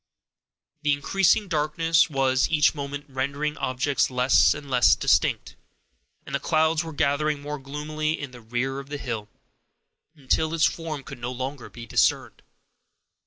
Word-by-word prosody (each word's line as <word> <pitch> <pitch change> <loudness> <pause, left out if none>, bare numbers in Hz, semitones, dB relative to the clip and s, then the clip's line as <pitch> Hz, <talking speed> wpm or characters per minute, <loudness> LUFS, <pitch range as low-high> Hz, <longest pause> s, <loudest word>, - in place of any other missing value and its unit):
The 150 -1 +2
increasing 195 +7 +2
darkness 160 +1 +2
was 135 -2 +1
each 150 -2 +3
moment 145 -1 -6
rendering 140 +3 -2
objects 135 +2 0
less 125 0 +4
and 150 -1 -9
less 125 -2 +4
distinct, - - +1 0.7
and 140 - -9
the 140 - 0
clouds 160 +2 +1
were 165 - -7
gathering 150 0 0
more 145 +1 -6
gloomily 155 +3 -3
in 140 -3 -6
the 125 -1 -12
rear 125 +4 -3
of 140 0 -10
the 145 - -4
hill, 115 -6 -5 0.9
until 155 +3 0
its 160 - +3
form 155 -4 -3
could 135 -2 -10
no 120 +1 -4
longer 130 +1 -6
be 120 -1 -10
discerned. 110 - +1
145 Hz, 150 wpm, -25 LUFS, 130-155 Hz, 0.9 s, less